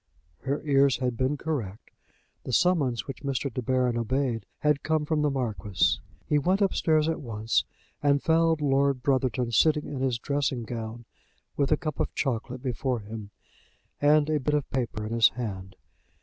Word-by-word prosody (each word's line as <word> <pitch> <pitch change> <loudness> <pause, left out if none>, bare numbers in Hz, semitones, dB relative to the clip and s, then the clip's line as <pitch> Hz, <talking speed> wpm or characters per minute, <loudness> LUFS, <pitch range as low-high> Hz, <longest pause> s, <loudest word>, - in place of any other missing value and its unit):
Her 140 +2 -3
ears 140 -2 +3
had 125 -1 -1
been 130 +4 0
correct. 120 -11 -4 0.5
The 130 - -5
summons 145 -10 +2
which 135 - -7
Mr. 140 -2 -2
De 125 - -2
Baron 125 -1 +1
obeyed 120 -2 -1
had 150 -1 +2
come 155 -1 0
from 155 0 0
the 150 - +2
Marquis. 110 -8 0 0.3
He 150 - +2
went 185 +7 +1
upstairs 160 -6 +2
at 165 - -1
once, 115 -3 0 0.4
and 145 -1 +3
found 165 -1 +3
Lord 140 -2 +2
Brotherton 130 -3 +1
sitting 150 +6 +3
in 140 - -5
his 130 -3 +1
dressing 140 -2 -1
gown, 115 0 -6 0.5
with 140 0 0
a 155 - +5
cup 155 -2 -4
of - - -2
chocolate 125 -1 -2
before 125 -2 -1
him, 105 0 -8 0.7
and 150 +1 +5
a 155 -1 +1
bit 150 +2 0
of 145 -2 -1
paper 120 -5 -2
in 110 - -4
his 115 -2 +6
hand. 95 -6 -6
135 Hz, 170 wpm, -27 LUFS, 120-150 Hz, 0.7 s, his